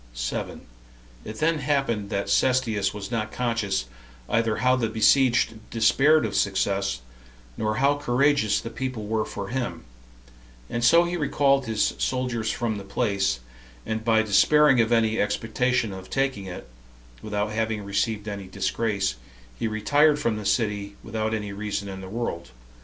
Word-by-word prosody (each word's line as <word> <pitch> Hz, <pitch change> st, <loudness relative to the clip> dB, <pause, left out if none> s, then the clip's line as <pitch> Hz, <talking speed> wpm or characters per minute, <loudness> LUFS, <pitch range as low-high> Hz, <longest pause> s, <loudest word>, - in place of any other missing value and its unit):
It 110 Hz, -, -7 dB
then 160 Hz, +3 st, +1 dB
happened 130 Hz, -8 st, 0 dB
that 100 Hz, -2 st, -2 dB
Cestius 115 Hz, -7 st, +2 dB
was 105 Hz, +1 st, -7 dB
not 110 Hz, -2 st, -2 dB
conscious 115 Hz, -, -1 dB, 0.4 s
either 115 Hz, -1 st, +1 dB
how 125 Hz, 0 st, +3 dB
the 115 Hz, -3 st, -1 dB
besieged 120 Hz, +2 st, +3 dB, 0.2 s
despaired 135 Hz, +6 st, +4 dB
of 105 Hz, -, -3 dB
success, 95 Hz, -7 st, 0 dB, 0.5 s
nor 110 Hz, -, -1 dB
how 140 Hz, +4 st, +2 dB
courageous 140 Hz, -4 st, +2 dB
the 115 Hz, -, -7 dB
people 130 Hz, -3 st, -4 dB
were 110 Hz, +1 st, -1 dB
for 100 Hz, -1 st, -6 dB
him; 120 Hz, -10 st, -3 dB, 0.9 s
and 120 Hz, -, -2 dB
so 170 Hz, +9 st, +6 dB
he 175 Hz, +1 st, -2 dB
recalled 140 Hz, -3 st, +2 dB
his 110 Hz, -2 st, +1 dB
soldiers 125 Hz, -4 st, -1 dB
from 110 Hz, -4 st, -2 dB
the -, -, -8 dB
place, 100 Hz, -, -1 dB, 0.4 s
and 110 Hz, 0 st, -3 dB
by 110 Hz, -1 st, +3 dB
despairing 135 Hz, +5 st, +5 dB
of 115 Hz, 0 st, 0 dB
any 110 Hz, -1 st, +2 dB
expectation 115 Hz, +2 st, 0 dB
of 95 Hz, 0 st, -9 dB
taking 135 Hz, -7 st, -1 dB
it, 90 Hz, -9 st, -8 dB, 0.5 s
without 105 Hz, 0 st, -2 dB
having 110 Hz, -1 st, -2 dB
received 105 Hz, +2 st, -1 dB
any 100 Hz, -2 st, -5 dB
disgrace, 100 Hz, -, -1 dB, 0.4 s
he -, -, 0 dB
retired 145 Hz, +8 st, +3 dB
from 115 Hz, -7 st, 0 dB
the 105 Hz, -2 st, -4 dB
city, 100 Hz, -2 st, -1 dB
without 110 Hz, -1 st, -2 dB
any 105 Hz, -2 st, -3 dB
reason 100 Hz, 0 st, -4 dB
in 95 Hz, -1 st, -7 dB
the 95 Hz, -, -8 dB
world. 100 Hz, -6 st, -4 dB
110 Hz, 150 wpm, -25 LUFS, 100-125 Hz, 0.9 s, so